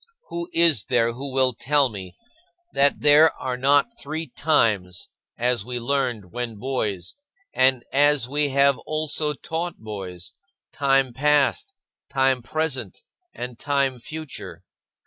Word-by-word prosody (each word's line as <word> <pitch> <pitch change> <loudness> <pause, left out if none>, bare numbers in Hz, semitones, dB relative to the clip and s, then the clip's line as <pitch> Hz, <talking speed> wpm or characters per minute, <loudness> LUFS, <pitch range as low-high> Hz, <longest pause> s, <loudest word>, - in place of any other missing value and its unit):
Who 170 +1 -5
is 165 -10 +4
there 115 -1 +1
who 135 +3 -6
will 130 -1 +2
tell 145 +3 +2
me 95 -6 -9 0.6
that 140 +1 +2
there 150 +2 +6
are 130 -1 -2
not 145 - +2
three 155 +3 -4
times 110 - 0 0.3
as 120 -2 0
we 125 +2 -4
learned 120 -7 -1
when 120 -2 -4
boys 105 -7 -3 0.4
and 130 -2 +3
as 145 -2 +3
we 145 +2 0
have 140 0 +3
also 155 -1 -1
taught 165 +4 -4
boys 95 -4 -7 0.4
time 135 -2 +2
past, 150 - +1 0.3
time 135 -2 +2
present, 155 - -3 0.3
and 125 0 -7
time 140 -3 0
future? 155 +3 -8
135 Hz, 125 wpm, -23 LUFS, 120-150 Hz, 0.6 s, there